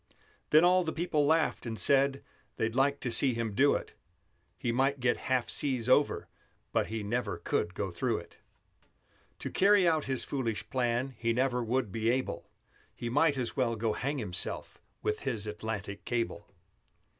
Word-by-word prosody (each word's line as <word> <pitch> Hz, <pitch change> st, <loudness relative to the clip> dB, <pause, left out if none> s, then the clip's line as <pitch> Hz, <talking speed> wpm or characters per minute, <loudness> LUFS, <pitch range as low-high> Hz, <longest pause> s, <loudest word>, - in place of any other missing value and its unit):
Then 155 Hz, +3 st, +6 dB
all 185 Hz, +1 st, +4 dB
the 160 Hz, -, -2 dB
people 155 Hz, -4 st, 0 dB
laughed, 160 Hz, +1 st, +2 dB
and 115 Hz, -2 st, -4 dB
said 140 Hz, +2 st, +3 dB, 0.3 s
They'd 110 Hz, 0 st, -1 dB
like 140 Hz, +2 st, +2 dB
to 125 Hz, -, -2 dB
see 130 Hz, +1 st, +5 dB
him 115 Hz, -2 st, -2 dB
do 140 Hz, +7 st, +4 dB
it; -, -, -5 dB, 0.6 s
He 120 Hz, -, -1 dB
might 135 Hz, +3 st, +1 dB
get 125 Hz, -1 st, +2 dB
half 130 Hz, -2 st, +2 dB
seas 130 Hz, -5 st, -1 dB
over, 140 Hz, +3 st, +3 dB, 0.4 s
but -, -, +1 dB
He 110 Hz, -1 st, -4 dB
never 120 Hz, +5 st, -2 dB
could 85 Hz, +2 st, -2 dB
go 100 Hz, -1 st, -3 dB
through 115 Hz, +5 st, -1 dB
it. 85 Hz, -, -11 dB, 1.0 s
To -, -, -5 dB
carry 195 Hz, -1 st, +4 dB
out 160 Hz, -2 st, +2 dB
his 130 Hz, -1 st, -1 dB
foolish 120 Hz, -6 st, -3 dB
plan 125 Hz, +1 st, 0 dB
He 115 Hz, -1 st, +1 dB
never 125 Hz, 0 st, +1 dB
would 120 Hz, -2 st, -1 dB
be 115 Hz, +2 st, 0 dB
able; 120 Hz, -9 st, -2 dB, 0.5 s
He 120 Hz, -, -4 dB
might 145 Hz, +1 st, +3 dB
as 125 Hz, -2 st, -3 dB
well 120 Hz, -4 st, +1 dB
go 110 Hz, 0 st, -1 dB
hang 140 Hz, +6 st, -2 dB
himself 90 Hz, -8 st, -4 dB, 0.2 s
With 105 Hz, -, 0 dB
his 115 Hz, -7 st, -3 dB
Atlantic 105 Hz, -1 st, -5 dB
Cable. 120 Hz, -1 st, -2 dB
125 Hz, 170 wpm, -30 LUFS, 115-140 Hz, 1.0 s, Then